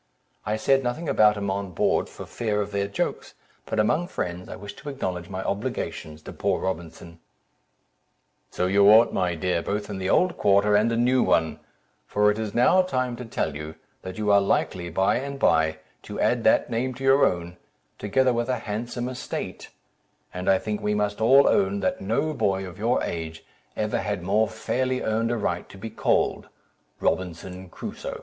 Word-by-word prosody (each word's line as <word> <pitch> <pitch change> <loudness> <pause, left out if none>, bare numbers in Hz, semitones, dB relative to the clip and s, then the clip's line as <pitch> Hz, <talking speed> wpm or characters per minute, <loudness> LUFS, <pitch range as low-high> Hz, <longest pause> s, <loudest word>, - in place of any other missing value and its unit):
I 105 - +1
said 135 +5 +2
nothing 130 +7 -3
about 105 -5 +4
him 100 -1 -2
on 100 -2 -4
board, - - +1
for - - -9
fear 105 -3 -2
of 105 0 -2
their 100 0 -1
jokes, 100 - -3 0.3
but 110 - -2
among 155 +11 +2
friends, 90 - -4
I - - -6
wish 100 0 -9
to 140 +2 -7
acknowledge 90 -11 -4
my 95 0 -4
obligations 80 -5 -4
to - - -8
poor - - 0
Robinson." 85 -2 -5 1.3
"So 90 - -1
you 100 +2 +5
ought, 110 +2 +7
my 90 -2 0
dear, 85 +1 0
both 105 +3 -3
in 95 - -4
the 95 0 -2
old 180 - +3
quarter 100 +1 +4
and 110 +3 +3
a 115 - 0
new 125 +2 +3
one, 80 -1 +1 0.5
for 105 0 +3
it 105 - -4
is 110 -2 -4
now 150 +10 +5
time 130 -9 -1
to 125 - -7
tell 80 -9 -2
you, 75 +1 -7 0.3
that 95 0 -8
you 105 -1 +1
are 100 0 +6
likely, 90 -2 0
by 95 +3 +2
and 140 +1 -4
by, 80 -10 +2 0.2
to - - -7
add - - +2
that - - +3
name 125 +2 -1
to 135 - -8
your 135 +1 +5
own, 85 0 0 0.4
together 130 +5 +2
with 120 +1 -1
a 130 - +1
handsome 120 +3 -3
estate; 130 -1 -6 0.6
and 90 +1 -2
I 95 - +5
think 105 +2 -4
we 105 0 0
must 105 0 -1
all 135 +5 +6
own, 100 0 +2
that - - -1
no 115 +10 0
boy 95 -8 0
of 90 0 -10
your 115 +4 +1
age 80 -1 -5 0.3
ever - - 0
had 85 - -3
more 105 +4 +2
fairly 130 +3 -2
earned 110 +1 0
a 120 - 0
right 90 -5 -2
to - - -12
be 110 +3 -7
called - - 0 0.5
'Robinson 90 +1 -3
Crusoe.'" - - -7
105 Hz, 190 wpm, -25 LUFS, 95-120 Hz, 1.3 s, ought